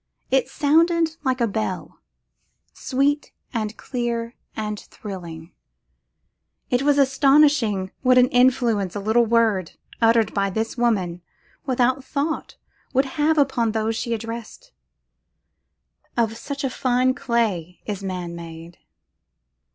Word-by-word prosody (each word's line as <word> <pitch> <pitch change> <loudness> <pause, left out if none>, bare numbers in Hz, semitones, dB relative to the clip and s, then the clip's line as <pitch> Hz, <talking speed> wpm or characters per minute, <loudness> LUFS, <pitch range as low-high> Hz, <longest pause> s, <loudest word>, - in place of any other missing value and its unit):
It 265 -1 +2
sounded 325 +2 +2
like 260 -2 0
a 235 - +2
bell, 110 - -4 0.7
sweet 280 +3 0 0.2
and 220 -2 -3
clear 235 -2 -3 0.2
and 210 -1 -3
thrilling; 170 -5 -9 1.2
it 245 0 +2
was 290 0 +3
astonishing 270 -7 +3
what 255 -1 +4
influence 245 -6 +3
a - - -2
little 220 +3 +2
word, 220 -7 +2 0.3
uttered 225 -2 +4
by 200 -1 +1
this 220 +3 -2
woman, 195 -8 0 0.5
without 255 +1 +1
thought, 300 +3 -3 0.4
would 265 +1 +3 0.2
have 315 +1 +3
upon 250 -6 +2
those 220 0 0
she 235 +1 -1
addressed. 230 - -8 1.5
Of 225 -1 +1
such 280 +4 -5
fine 255 -1 +2
clay 215 - -1
is 200 -2 -4
man 180 -3 -4
made. 165 0 -10
235 Hz, 110 wpm, -23 LUFS, 205-265 Hz, 1.5 s, what